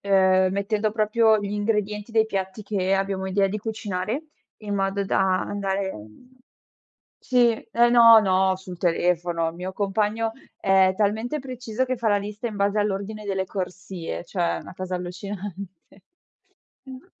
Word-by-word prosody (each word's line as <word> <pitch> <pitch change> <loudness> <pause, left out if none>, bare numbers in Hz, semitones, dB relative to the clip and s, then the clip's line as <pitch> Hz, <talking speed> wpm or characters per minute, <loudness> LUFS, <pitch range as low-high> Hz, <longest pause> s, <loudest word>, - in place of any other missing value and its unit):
uhm, 190 -1 +4
mettendo 205 +2 0
proprio 220 +1 +3
gli 200 0 -4
ingredienti 210 0 -1
dei 220 -1 +3
piatti 195 0 -4
che 195 -2 0
abbiamo 195 0 -1
idea 195 +1 +2
di 200 +2 -3
cucinare 215 - -3 0.3
in 205 -2 -4
modo 195 0 0
da 190 -1 +2
andare 195 -1 -2
mhmm 180 - -14 0.8
sì 245 -2 +3 0.2
eh 235 +1 +4
no, 230 -2 +8
no 190 -2 +2
sul 185 -1 -10
telefono. 175 -1 +1
Il 165 - -11
mio 180 +2 -5
compagno 210 +3 0 0.3
è 190 -1 +4
talmente 220 +8 0
preciso 255 -3 -3
che 255 0 -2
fa 230 -1 -1
la 205 -1 +4
lista 210 +3 -5
in 215 - -7
base 200 +1 +1
all'ordine 210 +1 -2
delle 190 -1 -1
corsie, 185 -2 -5
cioè 180 +2 -7 0.2
una - - -11
cosa 185 0 -4
allucinante. 190 +2 -6 1.2
Mh. 260 +1 -11
200 Hz, 150 wpm, -24 LUFS, 190-220 Hz, 1.2 s, no